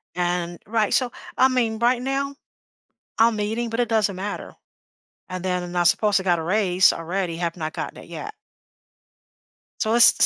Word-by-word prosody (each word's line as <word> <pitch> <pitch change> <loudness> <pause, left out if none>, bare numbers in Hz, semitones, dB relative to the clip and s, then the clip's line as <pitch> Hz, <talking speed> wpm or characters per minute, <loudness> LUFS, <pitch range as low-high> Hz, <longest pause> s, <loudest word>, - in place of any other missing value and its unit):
And 175 -1 -1
right, 220 -1 +1
so, 250 -2 +2 0.3
I 260 - +6
mean, 230 -4 0
right 245 +1 +2
now, 275 +1 -2 0.8
I'm 225 -1 +4
meeting, 220 +3 -2
but 230 +2 -1
it 240 - +1
doesn't 210 -3 +1
matter. 200 +2 -5 0.8
And 185 0 -5
then 180 -1 -2
I 175 - +3
supposed 205 +2 +3
got 175 -2 +2
a 160 - -4
raise 185 -1 +3
already, 170 0 -3
have 170 -1 -2
not 155 -1 -4
gotten - - -5
it - - -13
yet. - - -7 1.5
So, 220 +1 +1
it's 240 - +9
this - - +5
205 Hz, 170 wpm, -23 LUFS, 180-230 Hz, 1.5 s, it's